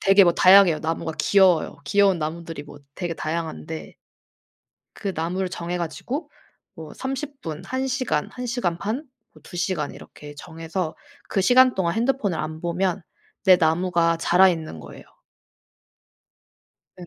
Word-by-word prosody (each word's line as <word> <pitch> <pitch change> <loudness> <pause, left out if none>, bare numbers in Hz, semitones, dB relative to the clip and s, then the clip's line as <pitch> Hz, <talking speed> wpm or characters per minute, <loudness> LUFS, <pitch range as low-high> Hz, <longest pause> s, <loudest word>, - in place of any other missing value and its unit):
되게 195 0 +6
뭐 175 - +4
다양해요. 185 -4 +6
나무가 160 0 -3
귀여워요. 185 -6 +3
귀여운 195 +3 +3
나무들이 160 0 -5
뭐 145 -1 -13 0.2
되게 175 -2 -4
다양한데 115 - -5 1.0
그 195 - -3
나무를 180 +4 -2
정해가지고 180 - -4 0.4
뭐 160 -3 -10
30 270 +2 -5
분, 160 +1 -6
1 260 +1 -2
시간, 255 - -1
1 250 0 -5
시간 230 -9 -1
반, 215 +6 -2 0.4
뭐 155 - -18
2 - - -10
시간 180 -4 -1
이렇게 145 0 -12
정해서 165 +2 -5 0.3
그 195 - 0
시간 255 +3 +6
동안 170 -3 0
핸드폰을 225 - 0
안 155 +1 -5
보면 180 +2 -1 0.4
내 185 -2 +7
나무가 170 0 +2
자라 180 +3 +5
있는 160 - -3
거예요. 70 - -12 1.9
네. 175 - -9
175 Hz, 270 characters per minute, -23 LUFS, 160-200 Hz, 1.9 s, 내